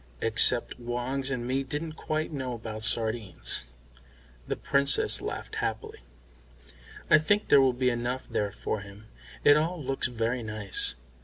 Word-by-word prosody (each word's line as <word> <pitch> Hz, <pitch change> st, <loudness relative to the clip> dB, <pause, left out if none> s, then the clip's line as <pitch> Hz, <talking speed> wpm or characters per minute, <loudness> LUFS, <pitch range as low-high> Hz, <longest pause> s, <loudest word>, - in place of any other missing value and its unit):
Except 115 Hz, +3 st, +2 dB
Woggs 125 Hz, +3 st, -2 dB
and 125 Hz, -3 st, -3 dB
me 130 Hz, +2 st, 0 dB
didn't 150 Hz, +4 st, -4 dB
quite 155 Hz, 0 st, -3 dB
know 130 Hz, -4 st, -3 dB
about 110 Hz, -1 st, -7 dB
sardines." 110 Hz, -, 0 dB, 0.8 s
The -, -, -1 dB
Princess 140 Hz, 0 st, +3 dB
laughed -, -, -5 dB
happily. -, -, -3 dB, 1.1 s
"I 155 Hz, -, +8 dB
think 205 Hz, +7 st, +1 dB
there 140 Hz, -, +7 dB
will 135 Hz, -1 st, +4 dB
be 125 Hz, +1 st, +1 dB
enough 120 Hz, +2 st, -3 dB
there 105 Hz, -1 st, -1 dB
for 105 Hz, -, -3 dB
him. 100 Hz, +2 st, -12 dB, 0.4 s
It 145 Hz, 0 st, +7 dB
all 165 Hz, +3 st, -1 dB
looks 135 Hz, -2 st, -1 dB
very 120 Hz, +1 st, -2 dB
nice." 105 Hz, -3 st, +2 dB
125 Hz, 145 wpm, -28 LUFS, 110-140 Hz, 1.1 s, I